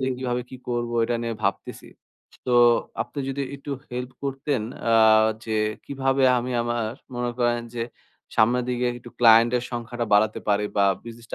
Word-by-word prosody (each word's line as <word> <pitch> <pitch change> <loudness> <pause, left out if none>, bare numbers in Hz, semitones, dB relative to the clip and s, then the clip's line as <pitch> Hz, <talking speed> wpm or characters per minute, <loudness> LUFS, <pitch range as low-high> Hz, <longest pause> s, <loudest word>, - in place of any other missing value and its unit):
দিকে 130 0 0
কিভাবে 125 -1 -2
কি 130 - -8
করবো, 120 -1 -2
এটা 120 +1 -1
নিয়ে 115 -1 -2
ভাবতেছি। 100 0 -3 0.6
সো, 125 - -1 0.5
আপনি 145 - -10
যদি 140 +1 -2
একটু 140 +1 -8 0.2
হেল্প 125 +1 -4
করতেন, 135 -3 -2 0.3
আ - - +4 0.5
যে 110 -1 -2 0.3
কিভাবে 135 -1 0 0.2
আমি 125 +1 -3
আমার 120 -2 -2 0.2
মনে 120 0 -1
করেন 120 -1 +1
যে, 115 - -2 0.5
সামনের 120 +3 +3
দিকে 125 0 -1
একটু 120 0 -13
ক্লায়েন্ট 115 0 +7
এর 120 - -2
সংখ্যাটা 120 0 -4
বাড়াতে 110 +1 +2
পারি 105 0 +2
বা 100 - +4 0.2
বিজনেসটা 115 -1 -9
120 Hz, 165 wpm, -24 LUFS, 115-125 Hz, 0.6 s, ক্লায়েন্ট